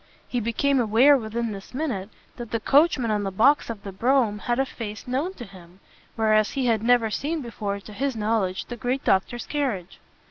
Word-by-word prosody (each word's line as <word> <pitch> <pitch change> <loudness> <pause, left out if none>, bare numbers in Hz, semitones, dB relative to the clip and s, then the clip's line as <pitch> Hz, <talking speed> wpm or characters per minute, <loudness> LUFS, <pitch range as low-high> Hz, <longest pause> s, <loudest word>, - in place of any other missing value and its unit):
He 245 - -1
became 245 +5 +1
aware 240 +5 +5
within 230 -2 -2
this 200 +4 -9
minute 245 -10 -3 0.3
that 240 -2 -7
the 230 - -1
coachman 275 -2 +3
on 210 -1 0
the 195 - -2
box 235 +11 +3
of 215 -3 -6
the 195 - -6
brougham 230 0 +1
had 240 +2 -1
a 270 - +2
face 215 -5 -7
known 285 +10 -2
to 240 - -8
him, 185 -2 -15 0.4
whereas 215 -1 +2
he 270 -2 -1
had 225 -3 +2
never 230 -1 +3
seen 305 +7 -2
before, 205 -4 -4
to 210 +1 -12
his 270 +4 -2
knowledge, 210 -4 -1
the 240 - -7
great 250 +4 -2
doctor's 215 +5 +1
carriage. 240 - -3
230 Hz, 200 wpm, -24 LUFS, 210-260 Hz, 0.4 s, aware